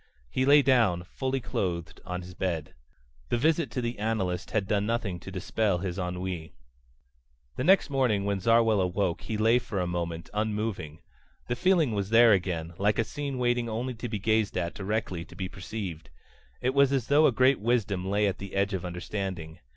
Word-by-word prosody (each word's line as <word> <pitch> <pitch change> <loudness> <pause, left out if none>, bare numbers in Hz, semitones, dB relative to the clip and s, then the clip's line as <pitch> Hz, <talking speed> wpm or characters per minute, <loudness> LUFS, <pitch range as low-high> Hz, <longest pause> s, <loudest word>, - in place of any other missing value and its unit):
He 130 +1 0
lay 145 0 +7
down, 115 -10 +3
fully 130 +8 -2
clothed, 85 -8 -3
on 90 0 -4
his 90 +1 -10
bed. 85 -4 -3 0.6
The - - +1
visit 160 +2 +2
to 120 +3 -3
the 120 -2 -3
analyst 105 -5 -1
had 100 -3 -1
done 105 -1 +1
nothing 110 -6 -1
to - - -9
dispel 95 +1 0
his 90 0 -4
ennui. 90 -2 -4 1.0
The - - -2
next 190 -1 +4
morning 120 -8 +1
when 100 -1 0
Zarwell 115 0 +4
awoke 90 -1 0
he 110 - -3
lay 115 +3 +4
for 105 -5 -4
a 90 - 0
moment, 85 -1 -3
unmoving. 105 -7 -2 0.5
The 120 - -1
feeling 165 0 +3
was 100 -2 -2
there 115 0 +7
again, 85 -3 -1
like 105 +1 +2
a 115 - +3
scene 140 +2 -4
waiting 120 -1 +1
only 120 +4 -3
to 120 +1 -6
be 110 - -2
gazed 110 0 +1
at 85 -2 -1
directly 95 -4 -3
to 85 - -15
be 95 +1 -3
perceived. 95 -4 -6 0.5
It 130 +1 +1
was 140 -1 +4
as 135 -4 +1
though 150 +3 +5
a - - +3
great 130 +3 +3
wisdom 100 -5 0
lay 105 +1 +2
at 100 -1 -1
the 100 0 -7
edge 100 +1 +1
of 95 - -2
understanding. 90 -2 -5
105 Hz, 190 wpm, -28 LUFS, 90-120 Hz, 1.0 s, lay